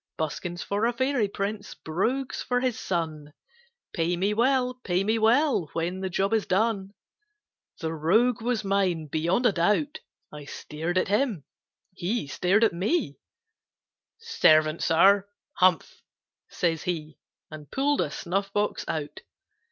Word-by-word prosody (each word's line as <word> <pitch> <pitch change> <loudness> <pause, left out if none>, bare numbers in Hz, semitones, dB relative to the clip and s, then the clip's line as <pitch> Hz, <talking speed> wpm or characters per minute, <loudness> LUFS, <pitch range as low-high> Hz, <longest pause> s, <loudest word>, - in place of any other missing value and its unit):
Buskins 170 +3 -4
for 205 +3 0
a 240 - 0
fairy 260 -2 +1
prince, 200 +1 -4
Brogues 235 +12 -2
for 245 0 0
his 250 -2 -1
son, 155 -4 -3 0.6
Pay 170 -1 0
me 200 +4 +1
well, 250 +2 +2
pay 180 +1 0
me 220 +3 +1
well, 230 - +3
When 170 +3 -2
the 190 0 -3
job 195 +4 0
is 220 -2 +1
done!" 200 0 0 0.9
The 160 -1 -2
rogue 220 +10 +2
was 235 -1 -1
mine, 195 -5 0
beyond 170 - 0
a 240 - +6
doubt. 210 - +1 0.3
I 150 -1 -9
stared 160 +5 -4
at 185 - +1
him, 210 - 0 0.5
he 190 +2 -2
stared 185 +9 +1
at 225 - +3
me; 205 - -1 1.0
"Servant, 155 - +3
Sir!" 195 +4 +4 0.3
"Humph!" 180 -3 +2 0.5
says 165 -3 -1
he, 155 -4 -4 0.3
And 150 -2 -10
pull'd 285 +2 +1
a - - -1
snuff 195 +3 -3
box 205 +1 -1
out. 150 -2 -4
195 Hz, 140 wpm, -26 LUFS, 165-225 Hz, 1.0 s, a